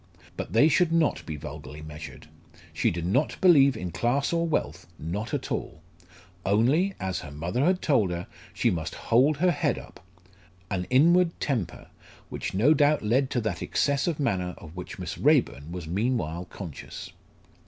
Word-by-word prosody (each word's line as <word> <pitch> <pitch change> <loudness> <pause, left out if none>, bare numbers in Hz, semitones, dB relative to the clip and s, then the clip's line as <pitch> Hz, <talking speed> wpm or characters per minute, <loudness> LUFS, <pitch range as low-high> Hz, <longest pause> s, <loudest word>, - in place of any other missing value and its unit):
But - - -5
they 115 +7 +6
should 170 +1 +3
not 165 -2 +2
be 80 - -4
vulgarly 75 0 -8
measured. 75 0 -9 0.5
She - - +1
did 85 -1 -3
not 130 - 0
believe 140 -9 +6
in 90 -4 -4
class 135 - 0
or 170 0 +1
wealth 160 - -2
not 100 +8 -4
at - - -3
all. 80 - -4 0.6
Only 135 - +2
as 95 -1 -2
her 75 - -8
mother 85 - -2
had 180 +3 +2
told 120 - +3
her 85 0 -4 0.3
she - - +1
must 80 -3 -3
hold 135 +6 +3
her 180 +4 +3
head 145 -3 0
up. - - -12 0.7
An 90 -2 -1
inward 170 +6 +4
temper, 115 - -2 0.4
which - - -4
no 125 +11 +5
doubt 150 -2 +3
led 130 +5 +2
to 120 - 0
that 110 - -3
excess 140 +1 0
of 165 -4 -1
manner 90 - -1
of 80 +1 -12
which 90 - -7
Miss 90 0 -6
Raeburn 130 - +2
was 90 -2 -6
meanwhile 90 -2 -1
conscious. 90 -4 -8
115 Hz, 170 wpm, -27 LUFS, 85-145 Hz, 0.7 s, they